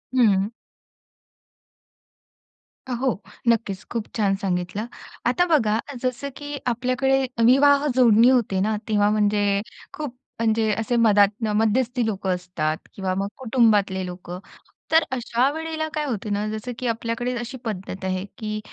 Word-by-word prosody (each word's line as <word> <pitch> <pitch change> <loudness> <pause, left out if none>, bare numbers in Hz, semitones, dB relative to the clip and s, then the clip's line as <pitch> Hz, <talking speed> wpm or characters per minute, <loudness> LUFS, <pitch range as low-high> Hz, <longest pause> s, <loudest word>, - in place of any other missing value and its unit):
हं. 205 -4 +3 2.4
अ, - - -5
हो 255 -6 0 0.3
नक्कीच. 220 -5 +1
खूप 230 -3 -2
छान 200 -3 +2
सांगितलं. 180 +2 -2 0.4
आता 255 +9 +3
बघा 225 -11 +2 0.2
जसं, 255 +2 -2
की 290 0 -6
आपल्याकडे 255 +2 +1 0.3
विवाह 280 +3 +5
जोडणी 235 -2 +6
होते 235 -7 +2
ना, 215 +3 +1
तेव्हा 205 -2 +3
म्हणजे 205 -1 +2 0.3
खूप 290 -5 -5 0.2
म्हणजे 220 -1 +2
असे 225 +2 -1
मधातन 210 -1 +4
मध्यस्थी 235 +2 +1
लोकं 200 -3 -2
असतात 170 -4 -2 0.2
किंवा 190 -1 -2
मग 195 +1 -1
कुटुंबातले 220 -7 +2
लोकं, 180 0 -7 0.5
तर 320 +1 +6
अशा 245 +1 +1
वेळेला 320 0 -3
काय 305 -1 -1
होत 230 -8 -3
ना, 205 +1 -1
जसं 220 +3 -5
की 255 - -2
आपल्याकडे 230 +2 -2
अशी 240 +3 -6
पद्धत 190 -3 -5
आहे, 185 0 -2
की 215 -2 -4
225 Hz, 135 wpm, -23 LUFS, 200-255 Hz, 2.4 s, जोडणी